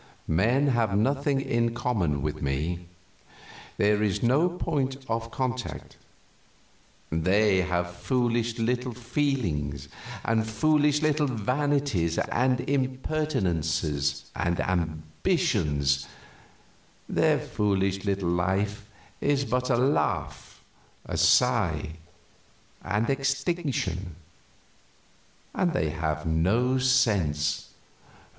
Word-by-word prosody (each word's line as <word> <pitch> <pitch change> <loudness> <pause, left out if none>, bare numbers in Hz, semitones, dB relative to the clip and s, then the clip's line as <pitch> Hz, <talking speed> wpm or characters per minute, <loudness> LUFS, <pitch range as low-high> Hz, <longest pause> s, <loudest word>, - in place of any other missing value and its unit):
Men 120 - +2
have 115 -6 +1
nothing 140 +4 +1
in 115 -2 0
common 95 - 0
with 75 0 -3
me 80 +6 -2 0.9
there 105 0 +3
is 105 0 0
no 140 +9 +3
point 145 -6 -2
of 115 0 -2
contact; 130 0 -4 1.2
they 95 +5 +3
have 90 -1 -2
foolish 120 -2 0
little 125 +1 -1
feelings 115 - -2 0.4
and 110 -1 +1
foolish 150 +5 +2
little 150 -1 +2
vanities 130 - 0
and 125 0 +1
impertinences 95 - -1
and 85 0 -1
ambitions; 80 - 0 1.0
their - - +3
foolish 95 -2 -1
little 100 -3 -1
life 100 +4 -1 0.3
is 140 -1 +1
but 125 0 -1
a 120 - +3
laugh, 130 +4 -1 0.4
a - - -5
sigh, 75 - +3 0.9
and 105 +4 0
extinction; 135 - -1 1.4
and 180 -3 +1
they 80 - 0
have 80 -1 -2
no 105 +11 +2
sense. 95 - +1
110 Hz, 90 wpm, -27 LUFS, 85-130 Hz, 1.4 s, there